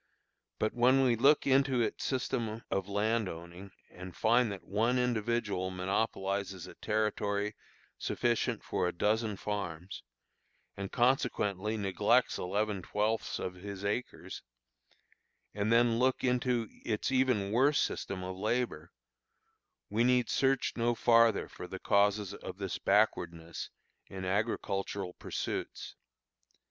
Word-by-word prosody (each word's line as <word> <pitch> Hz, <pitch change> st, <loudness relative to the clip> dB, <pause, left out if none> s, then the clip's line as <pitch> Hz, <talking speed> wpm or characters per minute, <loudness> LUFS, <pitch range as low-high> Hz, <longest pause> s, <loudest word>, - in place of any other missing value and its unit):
But 110 Hz, -, 0 dB
when 130 Hz, +3 st, +4 dB
we 125 Hz, -2 st, +4 dB
look 140 Hz, +6 st, +4 dB
into 135 Hz, -1 st, +3 dB
its 115 Hz, -, -1 dB
system 115 Hz, -4 st, -2 dB
of 95 Hz, 0 st, -1 dB
land 105 Hz, +1 st, +1 dB
owning, 85 Hz, +4 st, -9 dB, 0.2 s
and 90 Hz, 0 st, -9 dB
find 115 Hz, 0 st, +3 dB
that 100 Hz, -, -7 dB
one 115 Hz, +6 st, +1 dB
individual 115 Hz, -5 st, 0 dB
monopolizes 95 Hz, 0 st, -2 dB
a -, -, -10 dB
territory 105 Hz, -1 st, -1 dB, 0.4 s
sufficient 120 Hz, -2 st, 0 dB
for 90 Hz, -, -1 dB
a -, -, 0 dB
dozen 105 Hz, +3 st, 0 dB
farms, 95 Hz, -3 st, -4 dB, 0.7 s
and 100 Hz, 0 st, -5 dB
consequently 110 Hz, -5 st, +1 dB
neglects 105 Hz, +5 st, +2 dB
eleven 100 Hz, +1 st, -1 dB
twelfths 105 Hz, +4 st, -1 dB
of 90 Hz, -, -4 dB
his 100 Hz, +2 st, -7 dB
acres; 105 Hz, +5 st, -3 dB, 1.1 s
and 105 Hz, +2 st, -1 dB
then 115 Hz, 0 st, +4 dB
look 130 Hz, +1 st, +2 dB
into 125 Hz, -2 st, +1 dB, 0.2 s
its 110 Hz, +2 st, -1 dB
even 125 Hz, -7 st, +2 dB
worse 135 Hz, +6 st, +4 dB
system 95 Hz, -1 st, -2 dB
of 95 Hz, 0 st, -5 dB
labor, 105 Hz, -5 st, -2 dB, 1.0 s
we 110 Hz, +3 st, +2 dB
need 125 Hz, -1 st, +3 dB
search 135 Hz, -1 st, +2 dB
no 120 Hz, 0 st, +1 dB
farther 115 Hz, -2 st, +4 dB
for -, -, -9 dB
the -, -, -6 dB
causes 100 Hz, 0 st, +2 dB
of 95 Hz, -2 st, -8 dB
this 95 Hz, -2 st, -4 dB
backwardness 85 Hz, -6 st, 0 dB, 0.4 s
in 95 Hz, -1 st, -6 dB
agricultural 100 Hz, -2 st, -1 dB
pursuits. -, -, -5 dB
105 Hz, 125 wpm, -32 LUFS, 95-120 Hz, 1.1 s, when